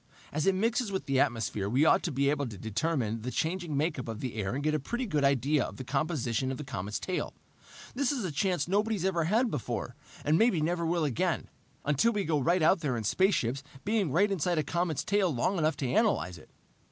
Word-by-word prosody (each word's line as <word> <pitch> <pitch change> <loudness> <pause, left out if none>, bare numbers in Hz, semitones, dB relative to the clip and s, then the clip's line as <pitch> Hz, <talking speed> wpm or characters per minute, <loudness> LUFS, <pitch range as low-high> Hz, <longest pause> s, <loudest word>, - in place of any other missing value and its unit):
As 155 +3 -1
it 195 - +4
mixes 225 +2 0
with 190 - -3
the 135 -2 +1
atmosphere 110 -5 0
we 135 +7 +3
ought - - +5
to 170 - -2
be 140 +1 +2
able 145 -2 -1
to 110 -4 -8
determine 115 - -1
the 125 - -3
changing 165 +1 -2
makeup 150 -4 -1
of 110 -1 -5
the 125 -3 -4
air 105 +1 -2
and 140 - -3
get 155 0 +1
a 155 - +1
pretty 240 - -3
good 150 -9 0
idea 140 +1 +3
of - - -7
the 130 - -5
composition 135 -3 -1
of 130 - -4
the 150 - -6
comet's 105 -5 -4
tail. 185 - -3 0.6
This 275 +2 +1
is 255 -8 -2
a 175 - -2
chance 175 +1 0
nobody's 205 0 0
ever 170 -4 +1
had 225 +6 +2
before 140 - -3 0.3
and 155 +2 +3
maybe 225 -7 +4
never 170 +2 0
will 170 0 +1
again, 135 -6 -1 0.4
until 150 - +3
we 205 -1 0
go 155 -4 +1
right 170 +5 +2
out 185 +4 +5
there 140 -7 -1
in 115 - -3
spaceships 135 - +1 0.2
being 205 -7 +1
right 200 +7 +3
inside 175 -2 0
a 155 - +2
comet's 170 -1 -1
tail 200 -3 +2
long 160 +9 0
enough 155 0 +1
to 130 -3 -2
analyze 115 - +1
it!" - - -18
155 Hz, 225 wpm, -30 LUFS, 130-185 Hz, 0.6 s, ought